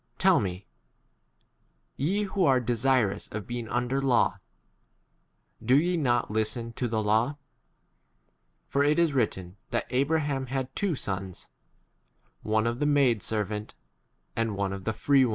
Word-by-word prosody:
Tell 190 Hz, -2 st, +5 dB
me, 95 Hz, -2 st, -4 dB, 1.3 s
ye 190 Hz, +10 st, 0 dB
who 195 Hz, -1 st, -1 dB
are 135 Hz, -5 st, +4 dB
desirous 120 Hz, -4 st, +1 dB
of 105 Hz, -1 st, -5 dB
being 120 Hz, -2 st, -5 dB
under 125 Hz, +3 st, 0 dB
law, 130 Hz, -3 st, +2 dB, 1.2 s
do 125 Hz, +4 st, +4 dB
ye 175 Hz, +3 st, +1 dB
not 125 Hz, -9 st, +1 dB
listen 115 Hz, +2 st, -1 dB
to 125 Hz, -, -2 dB
the 115 Hz, -, -7 dB
22 -, -, -3 dB
law? 115 Hz, +7 st, +2 dB, 1.3 s
For 140 Hz, -, +1 dB
it 150 Hz, +1 st, +3 dB
is 170 Hz, -3 st, +3 dB
written 95 Hz, -8 st, -1 dB
that -, -, -1 dB
Abra 140 Hz, +5 st, +2 dB
ham 135 Hz, -3 st, -2 dB
had 130 Hz, 0 st, -3 dB
two 200 Hz, -6 st, 0 dB
sons; 95 Hz, -6 st, -5 dB, 0.9 s
one 110 Hz, 0 st, +1 dB
of 120 Hz, +1 st, -1 dB
the 145 Hz, -, +1 dB
maid 135 Hz, -7 st, +3 dB
2 -, -, -2 dB
servant, 105 Hz, -1 st, -3 dB, 0.6 s
and 115 Hz, -2 st, -1 dB
one 100 Hz, -1 st, -1 dB
of 95 Hz, -1 st, -7 dB
the 110 Hz, -, 0 dB
free 140 Hz, +5 st, +3 dB
Slo. 130 Hz, -, +3 dB
120 Hz, 155 wpm, -27 LUFS, 110-140 Hz, 1.3 s, Tell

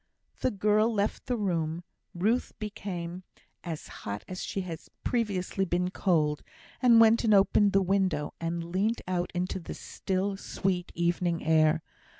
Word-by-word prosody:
The -, -, +2 dB
girl 210 Hz, +2 st, +2 dB
left 205 Hz, -1 st, -1 dB
the 245 Hz, -, 0 dB
room. 170 Hz, -5 st, -1 dB, 0.3 s
Ruth 220 Hz, +8 st, +1 dB
became 185 Hz, -4 st, -5 dB, 0.4 s
as 165 Hz, -4 st, -5 dB
hot 100 Hz, 0 st, -5 dB
as 185 Hz, -1 st, -6 dB
she 195 Hz, -, -3 dB
had 170 Hz, -4 st, -5 dB, 0.2 s
previously 200 Hz, -5 st, 0 dB
been 180 Hz, 0 st, 0 dB
cold, 155 Hz, -7 st, +1 dB, 0.4 s
and 240 Hz, -3 st, +7 dB
went 225 Hz, +1 st, +6 dB
and 215 Hz, -2 st, +5 dB
opened 200 Hz, +1 st, +4 dB
the 195 Hz, 0 st, +4 dB
window, 185 Hz, -5 st, 0 dB
and 170 Hz, 0 st, -2 dB
leant 210 Hz, +6 st, +1 dB
out 180 Hz, -1 st, -1 dB
into 180 Hz, +2 st, -1 dB
the 170 Hz, -, -7 dB
still, 195 Hz, +1 st, -2 dB
sweet, 185 Hz, -2 st, -2 dB
evening 170 Hz, -1 st, 0 dB
air. 155 Hz, 0 st, +4 dB
185 Hz, 150 wpm, -29 LUFS, 170-205 Hz, 0.4 s, and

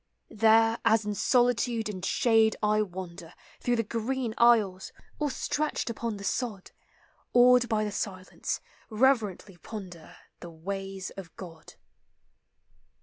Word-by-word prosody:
There, 225 Hz, +1 st, +4 dB
as 220 Hz, -1 st, +3 dB
in 210 Hz, -, -2 dB
solitude 240 Hz, 0 st, +1 dB
and 190 Hz, -4 st, -6 dB
shade 225 Hz, +2 st, +3 dB
I 210 Hz, 0 st, +3 dB
wander 180 Hz, -3 st, -7 dB, 0.2 s
Through 245 Hz, -, 0 dB
the 230 Hz, -, 0 dB
green 235 Hz, +2 st, -2 dB
aisles, 215 Hz, -6 st, +3 dB, 0.3 s
or 300 Hz, -1 st, 0 dB
stretched 295 Hz, -2 st, -2 dB
upon 230 Hz, -1 st, -4 dB
the 200 Hz, -, -9 dB
sod, 205 Hz, -2 st, -3 dB, 0.6 s
Awed 245 Hz, 0 st, +6 dB
by 215 Hz, -1 st, +1 dB
the 210 Hz, -, -3 dB
silence, 190 Hz, -2 st, -4 dB, 0.3 s
reverently 215 Hz, -6 st, +1 dB
ponder 180 Hz, -4 st, -10 dB, 0.2 s
The 175 Hz, -, -9 dB
ways 195 Hz, +3 st, -6 dB
of 185 Hz, -4 st, -10 dB
God. 165 Hz, -4 st, -11 dB
215 Hz, 125 wpm, -28 LUFS, 190-235 Hz, 0.6 s, Awed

